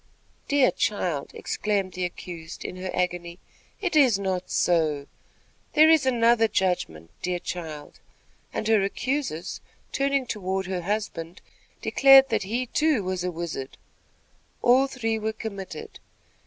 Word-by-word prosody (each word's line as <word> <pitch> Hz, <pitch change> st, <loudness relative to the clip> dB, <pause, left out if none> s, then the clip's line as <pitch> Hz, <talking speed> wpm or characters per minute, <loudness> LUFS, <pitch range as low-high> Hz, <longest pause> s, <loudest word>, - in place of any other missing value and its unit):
"Dear 285 Hz, -3 st, +4 dB
child!" 175 Hz, -8 st, -1 dB
exclaimed 200 Hz, -3 st, -1 dB
the 180 Hz, 0 st, -2 dB
accused, 175 Hz, -2 st, -8 dB
in 180 Hz, -, -5 dB
her 185 Hz, 0 st, -5 dB
agony, 175 Hz, -1 st, -2 dB, 0.4 s
"it 365 Hz, -5 st, -2 dB
is 260 Hz, -9 st, +5 dB
not 190 Hz, -2 st, -2 dB
so. 155 Hz, -5 st, +1 dB, 0.7 s
There 310 Hz, +1 st, +7 dB
is 310 Hz, -5 st, +4 dB
another 235 Hz, -2 st, +4 dB
judgment, 175 Hz, -, -1 dB
dear 180 Hz, 0 st, -1 dB
child," 160 Hz, -4 st, -7 dB, 0.5 s
and 215 Hz, -, -3 dB
her 220 Hz, -2 st, +4 dB
accusers, 220 Hz, -, -2 dB, 0.3 s
turning 275 Hz, -1 st, +1 dB
toward 190 Hz, -4 st, -2 dB
her 185 Hz, -1 st, -3 dB
husband, 185 Hz, -3 st, -3 dB, 0.4 s
declared 270 Hz, -1 st, +7 dB
that 220 Hz, -2 st, +1 dB
he, 230 Hz, +6 st, -2 dB
too, 300 Hz, -3 st, +1 dB
was 185 Hz, -1 st, -2 dB
a 180 Hz, -, -1 dB
wizard. 165 Hz, -6 st, -5 dB, 0.9 s
All 255 Hz, +3 st, +5 dB
three 225 Hz, -4 st, -2 dB
were 220 Hz, 0 st, -2 dB
committed. 200 Hz, -7 st, -7 dB
195 Hz, 130 wpm, -26 LUFS, 175-245 Hz, 0.9 s, There